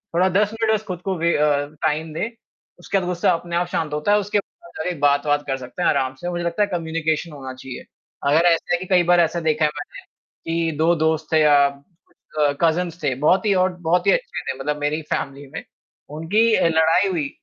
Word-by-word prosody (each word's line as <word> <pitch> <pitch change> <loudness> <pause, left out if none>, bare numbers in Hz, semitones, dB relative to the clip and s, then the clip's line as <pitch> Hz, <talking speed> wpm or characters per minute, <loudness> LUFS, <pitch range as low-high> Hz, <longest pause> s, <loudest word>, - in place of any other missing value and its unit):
थोड़ा 185 +2 +4
10 210 +3 +1
मिनट 225 -1 +1
बस 215 0 -1
ख़ुद 180 -1 -5
को 190 0 -2
वे 170 +1 +1
अ, 145 -1 +2 0.2
टाइम 155 +1 -1
दें 210 +8 -2 0.5
उसके 195 +3 -1
बाद 180 - -4
गुस्सा 180 -1 +1
अपने 170 0 -4
आप 175 0 +1
शांत 155 -4 -3
होता 150 +7 0
है 210 - +5
उसके 205 +1 0
बाद 170 -3 -13
जाके 175 +2 -3
बात-वात 145 0 +2
कर 135 -1 -1
सकते 130 +7 -8
हैं - - +3
आराम 130 -2 0
से 175 - -3
मुझे 175 -1 -3
लगता 170 +4 -1
है - - 0
कम्युनिकेशन 160 -1 -2
होना 135 -3 -8
चाहिए। 130 0 -9 0.5
अगर 160 +4 +4
ऐसा 170 +1 +2
है 175 - +1
कि 185 - -6
कई 180 -2 +4
बार 175 - +5
ऐसा 170 +1 +2
देखा 155 0 +2
है 150 - +1
मैंने 145 - -8 0.6
कि 165 -1 0
2 165 +2 +3
दोस्त 160 0 0
थे 160 - +5
या 150 -1 +5
अ, 145 0 -4
कज़िन्स 170 +1 0
थे 135 -3 +1
बहुत 190 +6 +3
ही 205 - +3
और 185 - -2 0.2
बहुत 180 +1 +2
ही - - +6
अच्छे - - -1
थे - - -13
मतलब 150 +2 -2
मेरी 150 +2 -1
फ़ैमिली 140 0 -4
में - - -6 0.5
उनकी 215 +8 +2
अ, - - +3
लड़ाई 160 +4 +3
हुई 155 -6 -2
165 Hz, 225 wpm, -21 LUFS, 150-180 Hz, 0.6 s, ही